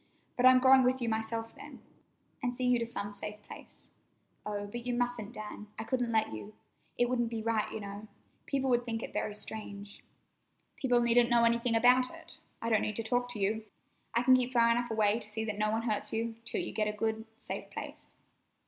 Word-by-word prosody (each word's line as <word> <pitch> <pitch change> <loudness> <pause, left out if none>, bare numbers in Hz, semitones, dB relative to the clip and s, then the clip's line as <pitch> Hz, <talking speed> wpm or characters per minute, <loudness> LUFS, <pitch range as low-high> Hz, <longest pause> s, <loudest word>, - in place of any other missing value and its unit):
"But 250 0 +5
I'm 255 0 +8
going 260 +1 +7
with 255 +1 +2
you 235 -2 -1
myself, 225 +1 -2
then, - - -11 0.6
and 245 0 -2
see 255 - -3
you 250 -1 +4
to 230 - -2
some 205 -3 -4
safe 210 +1 -6
place." - - -13 0.5
"Oh, 205 -1 -3
but 235 +4 -6
you 245 - 0
mustn't, 240 -3 -2
Dan. 210 -1 -8
I 220 - -3
couldn't 245 0 -1
let 220 - +1
you. 205 - -8 0.4
It 245 - +3
wouldn't 240 -2 0
be 225 -1 -4
right, 225 -2 0
you 220 - -5
know. 200 +1 -7 0.4
People 270 -2 0
would 240 0 +3
think 225 -2 -3
it - - -7
very 210 - -2
strange." 205 -1 -7 0.7
"People 245 -3 +2
needn't 235 0 +4
know 235 -1 +4
anything 235 0 +2
about 250 +2 +5
it. - - -12 0.2
I 230 - 0
don't 215 - +4
need 215 - -2
to 230 - -1
talk 245 +2 0
to 215 - -6
you. 215 +3 0 0.5
I 235 - +3
can 255 +1 +7
keep 255 0 0
far 235 -1 +5
enough 240 +1 0
away 220 0 +2
to 210 - -6
see 220 +1 -3
that 215 -1 -4
no 215 0 +2
one 220 +1 0
hurts 215 -3 0
you, 225 +1 -1
till - - -2
you - - -4
get 215 -1 0
a 210 - -1
good, 220 0 -1
safe - - -6
place." - - -8
230 Hz, 220 wpm, -31 LUFS, 215-245 Hz, 0.7 s, I'm